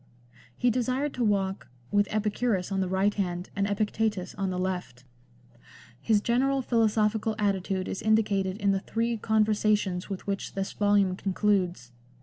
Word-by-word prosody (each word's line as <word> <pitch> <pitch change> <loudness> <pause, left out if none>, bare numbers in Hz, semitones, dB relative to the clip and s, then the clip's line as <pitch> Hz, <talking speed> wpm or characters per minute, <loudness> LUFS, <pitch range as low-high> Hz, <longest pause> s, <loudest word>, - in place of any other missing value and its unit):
He 245 - +2
desired 255 +4 -1
to 245 - -1
walk 195 - 0
" 120 - -30
with 205 -1 +3
Epicurus 210 -2 0
on 195 - 0
the 190 - 0
right 190 +2 +2
hand 180 -2 -3
and 200 -1 0
Epictetus 210 -2 -1
on 195 0 -2
the 180 - -3
left." 180 -10 -3 1.0
His 215 -2 +2
general 265 +4 +1
philosophical 220 -2 +1
attitude 195 -2 -1
is - - -4
indi 220 +1 +4
cated 195 -2 -1
in 200 -1 +2
the 195 - +1
three 230 +4 -1
Conversations 215 -4 +1
with 195 -2 -5
which 195 -1 -4
this 195 0 -2
volume 205 -2 +2
concludes. 185 - 0
205 Hz, 155 wpm, -27 LUFS, 190-220 Hz, 1.0 s, indi